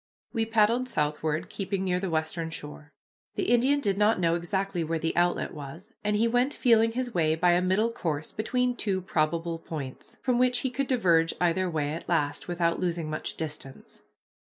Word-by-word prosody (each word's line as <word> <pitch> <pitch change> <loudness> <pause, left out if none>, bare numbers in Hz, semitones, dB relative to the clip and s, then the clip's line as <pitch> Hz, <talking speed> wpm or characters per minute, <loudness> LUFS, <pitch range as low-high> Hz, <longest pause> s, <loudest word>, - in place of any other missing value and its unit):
We 225 -2 0
paddled 230 +3 +2
southward, 150 -1 -1
keeping 195 -1 -3
near 180 -1 0
the 190 0 -2
western 160 +1 -2
shore. 150 -1 -9 0.4
The 375 - 0
Indian 260 +4 +4
did 200 -5 0
not 210 -1 +4
know 165 -2 +2
exactly 175 +1 -1
where 165 +1 -1
the 160 +1 -2
outlet 175 0 +1
was, 150 +3 -9
and 210 0 +1
he 225 +3 +3
went 245 +4 +1
feeling 230 -2 +4
his 245 -1 -3
way 160 -3 +2
by 175 +2 +3
a 175 +1 +3
middle 195 +5 +2
course 155 -8 -3
between 250 +3 0
two 195 -5 -1
probable 165 -1 -1
points, 145 -6 -7
from 250 -2 +2
which 250 -1 +3
he 260 - -1
could 275 +2 -2
diverge 170 -10 +3
either 180 +1 +1
way 150 -3 -1
at 165 - -7
last 150 -4 0
without 170 -1 0
losing 170 -3 -2
much 155 - -4
distance. 150 -4 -8
180 Hz, 185 wpm, -28 LUFS, 160-225 Hz, 0.4 s, Indian